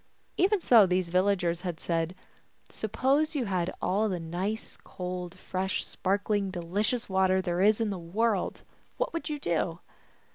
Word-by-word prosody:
Even 395 Hz, +3 st, +3 dB
so 230 Hz, -, +6 dB
these 180 Hz, -1 st, +1 dB
villagers 180 Hz, -2 st, +1 dB
had 175 Hz, -3 st, -4 dB
said, 165 Hz, +1 st, -1 dB, 0.3 s
" -, -, -37 dB
Suppose 275 Hz, +8 st, +1 dB
you 265 Hz, -4 st, 0 dB
had 185 Hz, -3 st, 0 dB
all 205 Hz, +4 st, +1 dB
the 180 Hz, -2 st, -2 dB
nice 180 Hz, +6 st, -4 dB
cold, 180 Hz, 0 st, -5 dB
fresh, 185 Hz, +1 st, -2 dB
sparkling, 200 Hz, +1 st, 0 dB
delicious 200 Hz, +7 st, -1 dB
water 190 Hz, -1 st, +3 dB
there 175 Hz, -1 st, -1 dB
is 210 Hz, +2 st, +5 dB
in 225 Hz, -2 st, 0 dB
the 190 Hz, -, -4 dB
world, 200 Hz, +4 st, -1 dB, 0.3 s
what -, -, -1 dB
would 335 Hz, -1 st, -3 dB
you 300 Hz, -, -2 dB
do 170 Hz, -, 0 dB
190 Hz, 155 wpm, -29 LUFS, 180-220 Hz, 0.3 s, so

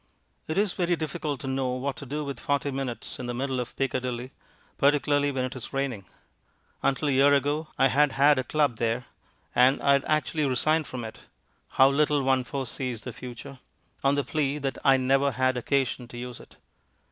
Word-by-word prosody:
It 155 Hz, -, -3 dB
is 205 Hz, -2 st, +2 dB
very 175 Hz, -1 st, +1 dB
difficult 155 Hz, -2 st, -3 dB
to 135 Hz, -, -6 dB
know 130 Hz, -1 st, -1 dB
what 130 Hz, +2 st, -2 dB
to 140 Hz, -, -8 dB
do 150 Hz, +3 st, -3 dB
with 140 Hz, -1 st, -5 dB
forty 140 Hz, 0 st, -1 dB
minutes 130 Hz, -3 st, -5 dB
in 125 Hz, -, -5 dB
the 120 Hz, -, -3 dB
middle 130 Hz, 0 st, -2 dB
of 125 Hz, -, -5 dB
Piccadilly, 130 Hz, -1 st, -2 dB, 0.5 s
particularly 145 Hz, 0 st, +3 dB
when 130 Hz, -2 st, -1 dB
it 130 Hz, -, -6 dB
is 130 Hz, +1 st, -8 dB
raining. 135 Hz, -8 st, -2 dB, 0.8 s
Until 140 Hz, +2 st, +1 dB
a -, -, +2 dB
year 140 Hz, +2 st, +5 dB
ago 145 Hz, +3 st, 0 dB
I 135 Hz, -, +4 dB
had 145 Hz, +1 st, +3 dB
had 145 Hz, 0 st, +5 dB
a -, -, 0 dB
club 145 Hz, -4 st, +1 dB
there, 115 Hz, +1 st, -1 dB, 0.5 s
and 130 Hz, +2 st, +5 dB
I 140 Hz, -, +3 dB
had 140 Hz, 0 st, +3 dB
actually 155 Hz, 0 st, 0 dB
resigned 155 Hz, +4 st, +1 dB
from 125 Hz, -2 st, -6 dB
it 110 Hz, -, -8 dB, 0.6 s
(how 135 Hz, -, +8 dB
little 145 Hz, 0 st, +2 dB
one 130 Hz, -1 st, +2 dB
foresees 125 Hz, -3 st, -4 dB
the 125 Hz, -, -6 dB
future!) 125 Hz, +3 st, -9 dB, 0.4 s
on 135 Hz, +1 st, +3 dB
the 145 Hz, -, +1 dB
plea 145 Hz, +1 st, -1 dB
that 135 Hz, -2 st, -3 dB
I 135 Hz, -1 st, +6 dB
never 135 Hz, +1 st, +2 dB
had 130 Hz, 0 st, +1 dB
occasion 125 Hz, -1 st, -1 dB
to 120 Hz, -, -10 dB
use 125 Hz, 0 st, -6 dB
it. -, -, -16 dB
135 Hz, 195 wpm, -27 LUFS, 125-145 Hz, 0.8 s, how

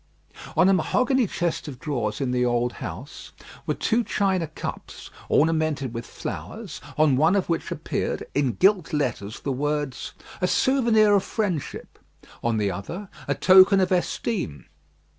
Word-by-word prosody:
On -, -, +6 dB
a 195 Hz, -, +5 dB
mahogany 250 Hz, +7 st, +2 dB
chest 170 Hz, -3 st, -2 dB
of 135 Hz, -4 st, -7 dB
drawers 120 Hz, -9 st, -2 dB
in 135 Hz, -3 st, -1 dB
the 125 Hz, 0 st, +1 dB
old 120 Hz, 0 st, +1 dB
house 145 Hz, +5 st, -8 dB, 0.3 s
were -, -, 0 dB
two 235 Hz, +1 st, +1 dB
china 190 Hz, -6 st, 0 dB
cups, 155 Hz, -, -7 dB, 0.2 s
ornamented 155 Hz, -5 st, +1 dB
with 115 Hz, 0 st, -6 dB
flowers, -, -, -7 dB, 0.2 s
on 150 Hz, -4 st, +4 dB
one 160 Hz, +7 st, +4 dB
of 195 Hz, -3 st, 0 dB
which 165 Hz, -, -1 dB
appeared, -, -, -3 dB
in 135 Hz, -4 st, +1 dB
gilt 185 Hz, -4 st, +2 dB
letters, 120 Hz, -8 st, -2 dB
the 140 Hz, -, -2 dB
words, 145 Hz, -1 st, -2 dB, 0.3 s
"A 180 Hz, -, +2 dB
souvenir 230 Hz, -4 st, +3 dB
of 200 Hz, -1 st, +3 dB
friendship;" 190 Hz, -, -3 dB, 0.4 s
on 115 Hz, -1 st, +1 dB
the 100 Hz, -2 st, +1 dB
other, 170 Hz, -, -6 dB, 0.2 s
"A -, -, 0 dB
token 190 Hz, +1 st, +7 dB
of 185 Hz, -1 st, +1 dB
esteem." 175 Hz, -, -1 dB
155 Hz, 150 wpm, -24 LUFS, 130-195 Hz, 0.4 s, token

